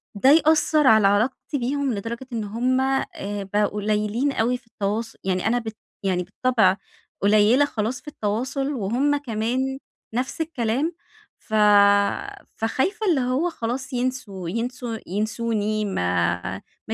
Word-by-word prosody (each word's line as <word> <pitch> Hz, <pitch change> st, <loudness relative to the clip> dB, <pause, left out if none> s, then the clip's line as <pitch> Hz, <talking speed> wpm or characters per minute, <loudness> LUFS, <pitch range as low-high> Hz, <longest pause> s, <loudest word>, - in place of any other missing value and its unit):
ده 230 Hz, +6 st, +4 dB
يأثر 310 Hz, -1 st, +4 dB
على 220 Hz, -3 st, +6 dB
علاقتي 225 Hz, +8 st, 0 dB
بيهم، 270 Hz, +1 st, -1 dB
لدرجة 230 Hz, +5 st, -5 dB
إن 225 Hz, -2 st, -2 dB
هُم 250 Hz, +5 st, 0 dB
آآ، 205 Hz, -6 st, -2 dB
بقوا 210 Hz, 0 st, +3 dB
قليلين 210 Hz, +6 st, 0 dB
أوي 245 Hz, +1 st, +1 dB
في 245 Hz, -2 st, -28 dB
التواص 220 Hz, +2 st, -3 dB
يعني 185 Hz, 0 st, 0 dB
أنا 240 Hz, +2 st, +2 dB
ب 225 Hz, -, -9 dB, 0.4 s
يعني 185 Hz, -2 st, 0 dB
بالطبع 200 Hz, 0 st, +2 dB, 0.4 s
قليلة 215 Hz, +7 st, +5 dB
خلاص 235 Hz, -1 st, -3 dB
في -, -, -30 dB
التواصل 265 Hz, +3 st, -2 dB
وهُم 255 Hz, +6 st, +1 dB
كمان 255 Hz, +1 st, -2 dB, 0.4 s
نفس 260 Hz, +6 st, -2 dB
الكلام، 295 Hz, 0 st, -1 dB, 0.5 s
ف 220 Hz, -, -13 dB, 1.0 s
فخايفة 385 Hz, -, -1 dB
اللي 305 Hz, -7 st, +3 dB
هو 255 Hz, +8 st, 0 dB
خلاص، 260 Hz, 0 st, -4 dB
ينسوا 245 Hz, -8 st, -3 dB
ينسو 235 Hz, +2 st, -3 dB
ينسوني، 215 Hz, +1 st, -1 dB
ما 90 Hz, -, 0 dB, 0.5 s
ما -, -, -2 dB
235 Hz, 130 wpm, -23 LUFS, 210-265 Hz, 1.0 s, على